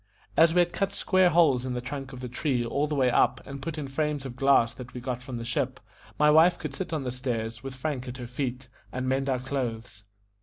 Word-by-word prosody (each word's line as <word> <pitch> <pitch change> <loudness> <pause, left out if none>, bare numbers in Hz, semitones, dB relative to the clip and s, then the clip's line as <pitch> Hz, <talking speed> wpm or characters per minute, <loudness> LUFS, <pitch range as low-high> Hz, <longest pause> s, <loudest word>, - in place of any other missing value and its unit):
As 165 +1 +5
we 180 - +6
had 175 0 0
cut 195 0 -1
square 185 -2 +3
holes 150 -7 +4
in 130 -1 -3
the - - -1
trunk 135 +2 -6
of 130 -2 -9
the 125 - -4
tree 125 0 -1
all 140 +5 0
the 150 - -2
way 130 -3 +3
up, - - +3
and 140 0 -7
put 155 +2 -4
in 145 -2 -4
frames 145 0 -1
of 125 -2 -6
glass 135 -3 +4
that 125 -1 -10
we - - -4
got 125 0 -4
from 125 -1 -6
the 115 - -5
ship, 130 +2 -1 0.4
my 150 0 +5
wife 165 +3 +6
could 150 -3 -5
sit 185 +5 -5
on 155 -4 -1
the 125 - -2
stairs, 120 -3 -3
with 135 -1 -7
Frank 130 -1 -3
at 125 +1 -6
her 125 - -6
feet, 125 +1 -4 0.2
and 130 0 -3
mend 135 +1 0
our 130 - +2
clothes. 120 -5 -4
135 Hz, 255 wpm, -27 LUFS, 125-150 Hz, 0.4 s, we